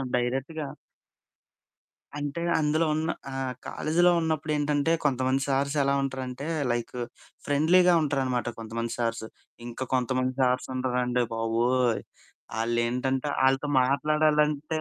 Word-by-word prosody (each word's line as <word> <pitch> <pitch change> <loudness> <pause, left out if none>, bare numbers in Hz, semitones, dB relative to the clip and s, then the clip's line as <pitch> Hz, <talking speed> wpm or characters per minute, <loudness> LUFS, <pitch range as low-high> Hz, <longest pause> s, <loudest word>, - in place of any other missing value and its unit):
డైరెక్ట్‌గా. 135 +5 -2 1.5
అంటే 145 +3 -3 0.2
అందులో 155 +2 +2
ఉన్న 160 +1 -1 0.2
ఆహ్, 130 -1 -3
కాలేజీలో 175 +3 +2
ఉన్నప్పుడు 155 -1 -1
ఏంటంటే, 145 +2 +1
కొంతమంది 130 0 +1
సార్స్ 140 +1 0
ఎలా 140 - +2
ఉంటారంటే 130 0 -4 0.3
లైక్ 120 -1 -3 0.5
ఫ్రెండ్లీగా 175 +5 +4
ఉంటారనమాట 130 -5 0
కొంతమంది 115 +1 -4
సార్స్. 115 -1 -1 0.4
ఇంకా 120 +2 -5
కొంతమంది 130 0 +1
సార్స్ 125 0 +2
ఉంటారండి 125 -1 0
బాబోయ్! 115 +2 +1 0.6
ఆళ్ళేంటంటే, 125 +4 0
వాళ్ళతో 135 +2 +3
మాట్లాడాలంటే 150 +2 +1
135 Hz, 100 wpm, -27 LUFS, 125-150 Hz, 1.5 s, ఫ్రెండ్లీగా